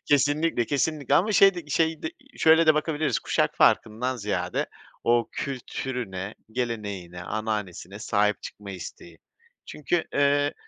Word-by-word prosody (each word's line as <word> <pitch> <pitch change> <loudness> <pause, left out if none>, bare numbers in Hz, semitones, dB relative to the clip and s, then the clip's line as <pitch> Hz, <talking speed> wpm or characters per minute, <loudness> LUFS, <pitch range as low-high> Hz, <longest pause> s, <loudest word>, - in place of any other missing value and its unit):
Kesinlikle, 145 -2 +2
kesinlikle 145 -1 0
ama 205 +8 +3
şey 195 -1 +6
de 175 -3 -7
şey 160 +1 +1
de, 160 - -2 0.3
şöyle 160 +1 +6
de 155 - +7
bakabiliriz, 155 -1 0
kuşak - - 0
farkından 125 +4 +2
ziyade 95 -5 -2 0.4
o 120 0 +3
kültürüne, 120 -7 -4 0.2
geleneğine, 100 -8 -4
ananesine 105 -3 -4
sahip 105 -2 +1
çıkma 100 -1 -8
isteği. 85 -2 -9 0.5
Çünkü, 155 +3 -1
eee, 145 0 +3
125 Hz, 125 wpm, -26 LUFS, 105-150 Hz, 0.5 s, de